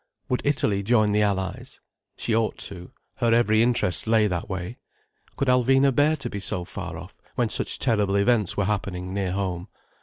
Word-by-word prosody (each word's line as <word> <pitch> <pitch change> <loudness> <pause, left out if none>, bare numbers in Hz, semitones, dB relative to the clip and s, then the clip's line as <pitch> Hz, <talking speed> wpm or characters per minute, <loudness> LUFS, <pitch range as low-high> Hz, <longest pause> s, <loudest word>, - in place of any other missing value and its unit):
Would 125 - 0
Italy 120 -9 +1
join 110 0 +3
the 105 +1 +2
Allies? 95 -2 -2 0.4
She 115 - -1
ought 115 -1 0
to, 90 -2 -8 0.3
her 120 -1 +1
every 110 -2 +3
interest 120 -5 0
lay 110 -1 +4
that 90 -4 -2
way. 95 +5 -5 0.6
Could 140 - -1
Alvina 135 +2 +4
bear 150 +4 +3
to 140 - -5
be 100 - -5
so 90 -2 -3
far - - -6
off, - - -10 0.2
when - - +1
such - - +1
terrible 105 -5 +1
events 105 -1 +2
were 100 - +1
happening 95 -3 -3
near 95 -2 -1
home? 95 -2 -3
105 Hz, 180 wpm, -25 LUFS, 95-120 Hz, 0.6 s, lay